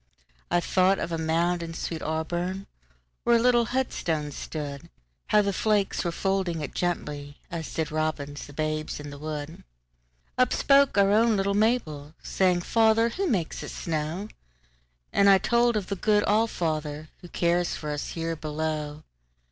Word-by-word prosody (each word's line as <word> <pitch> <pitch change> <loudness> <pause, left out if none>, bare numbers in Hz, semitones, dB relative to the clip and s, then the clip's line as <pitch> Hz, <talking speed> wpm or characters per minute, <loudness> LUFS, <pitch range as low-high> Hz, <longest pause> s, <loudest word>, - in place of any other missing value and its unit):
I 175 - +3
thought 185 +2 +3
of - - -3
a 165 - -2
mound 170 +2 +1
in 165 -1 -6
sweet 165 -1 -4
AuburnWhere 175 +5 -2 0.6
a - - +5
little 240 0 +4
headstone 170 - -1
stood; 145 +2 -6 0.4
How 210 0 +4
the 200 0 0
flakes 210 -1 +1
were 170 - -1
folding 190 -3 -1
it 145 - -5
gently, 150 -5 -3
As 165 -2 -5
did 160 -1 -1
robins 155 -2 -3
the 145 - -12
babes 155 +1 -2
in 145 -1 -7
the 145 - -9
wood. 155 +1 -6 0.8
Up 255 0 +4
spoke 275 -4 +4
our 200 0 +5
own 220 +1 +4
little 195 +1 +1
Mabel, 170 -9 0
Saying, 180 -2 +2
"Father, 225 +3 +3
who 385 +11 -2
makes 185 - -1
it - - -6
snow?"And 60 - -3
I 195 - +8
told 235 +3 +2
of 205 - -2
the 200 - -3
good 210 +2 +2
All 220 +2 +3
fatherWho 155 -2 -4
cares 175 0 +1
for 150 -1 -5
us 145 0 -4
here 165 0 -2
below. 155 -1 -3
170 Hz, 155 wpm, -26 LUFS, 155-200 Hz, 0.8 s, I